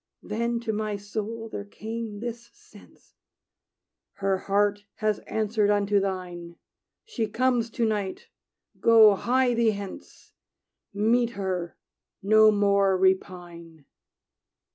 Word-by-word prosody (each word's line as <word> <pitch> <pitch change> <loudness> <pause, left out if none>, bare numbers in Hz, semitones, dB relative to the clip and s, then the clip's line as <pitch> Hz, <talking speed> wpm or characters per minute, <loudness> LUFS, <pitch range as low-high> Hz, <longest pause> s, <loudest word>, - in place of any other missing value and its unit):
Then 235 +2 -2
to 225 -2 -3
my 215 0 -2
soul 215 +3 -5
there 210 - -6
came 220 0 -7
this 235 0 -6
sense: 425 +1 -20 1.0
"Her 195 -1 -1
heart 205 +1 +1
has 215 -1 -1
answered 215 -1 0
unto 205 0 +2
thine; 180 -3 -5 0.5
She 240 - -3
comes, 240 +1 0
to 230 +1 -1
night. 205 -3 -3 0.5
Go, 225 -2 +7
hie 250 +4 +1
thee 235 -1 +2
hence! 200 -1 -10 0.6
Meet 230 +4 +2
her: 185 -3 -3 0.5
no 215 +2 +6
more 200 -2 +3
repine!" 175 -4 -2
210 Hz, 110 wpm, -26 LUFS, 195-230 Hz, 1.0 s, Go